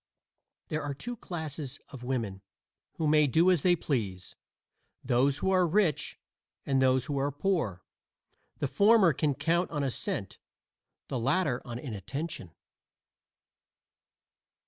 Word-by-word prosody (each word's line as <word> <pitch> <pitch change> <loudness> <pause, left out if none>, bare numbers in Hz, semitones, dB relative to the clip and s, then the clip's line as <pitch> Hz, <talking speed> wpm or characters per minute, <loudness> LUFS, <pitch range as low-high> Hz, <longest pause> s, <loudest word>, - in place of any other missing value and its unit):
There 155 0 -1
are 145 -1 -4
two 240 - -5
classes 155 - -5
of 130 -3 -10
women 115 -7 -3 0.5
who 160 - -2
may 150 0 +5
do 165 +7 +4
as 175 -5 +2
they 175 +3 +4
please; 100 - -3 0.7
those 130 +2 +2
who 190 - 0
are 185 -2 +4
rich 175 -3 +1 0.5
and 135 -1 +2
those 130 -1 +3
who 140 0 -2
are 140 +1 0
poor. 145 - -1 0.7
The 145 - -1
former 200 - +5
can 145 0 0
count 170 +4 +1
on 150 -3 -2
assent, 135 -3 -3 0.7
the 130 - -2
latter 135 +1 +1
on 120 -2 -5
inattention. 125 - -5
145 Hz, 125 wpm, -29 LUFS, 130-170 Hz, 0.7 s, may